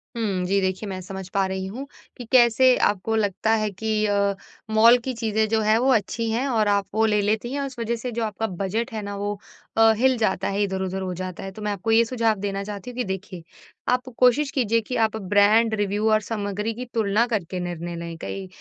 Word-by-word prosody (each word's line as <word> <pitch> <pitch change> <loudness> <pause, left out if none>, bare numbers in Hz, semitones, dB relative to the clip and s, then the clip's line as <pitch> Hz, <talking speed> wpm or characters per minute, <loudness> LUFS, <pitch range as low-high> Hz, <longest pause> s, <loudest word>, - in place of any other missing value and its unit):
हुँ। 200 -6 -1
जी 195 +2 +2
देखिए 190 +2 -2
मैं 185 -1 -4
समझ 190 0 -7
पा 195 -1 +2
रही 190 0 -3
हूँ 255 +8 -6 0.3
कि 245 - -8
कैसे 250 +1 +6
आपको 205 +2 -2
लगता 215 0 0
है 215 - 0
कि 215 +2 -1
अ, 200 -1 +1 0.4
मॉल 230 +3 +7
की 255 +2 -4
चीज़ें 220 -2 0
जो 220 -1 +2
हैं, 215 +1 +3
वो 260 +3 +2
अच्छी 225 +2 -1
हैं, 250 +5 0
और 220 -5 +1
आप 200 -1 +2
वो 220 +1 +3
ले 210 -1 +2
लेती 215 +4 -1
हैं, 285 - -2
और - - -2
उस 255 -3 -10
वजह 230 +1 -1
से 240 +2 -5
जो 230 0 -2
आपका 220 +1 -2 0.2
बजट 225 +6 -2
है 215 - -3
ना 200 0 -5
वो, 205 0 -3 0.4
अ, 225 0 +7
हिल 260 +1 +3
जाता 220 - 0
है, 200 +1 -1
इधर-उधर 190 -1 -2
हो 185 -1 -3
जाता 185 0 -6
है। 195 - -6
तो 210 +3 -11
मैं 210 - -1
आपको 205 +3 -2
ये 230 +1 +6
सुझाव 230 -2 +1
देना 200 0 -3
चाहती 205 +2 -7
हूँ - - -14
कि 250 - 0
देखिए, 190 -2 -6 0.5
आप 250 +1 +1
कोशिश 255 +3 +4
कीजिए 230 -3 +1
कि 250 - -3
आप 220 - -4
ब्रांड 210 +3 +3
रिव्यू 205 +1 0
और 215 - +4
सामग्री 210 0 -3
की 250 +3 -6
तुलना 220 0 +2
करके 195 -6 -2
निर्णय 175 -1 -5
लें। 170 0 -6
कई 195 -1 -5
215 Hz, 230 wpm, -24 LUFS, 195-230 Hz, 0.5 s, मॉल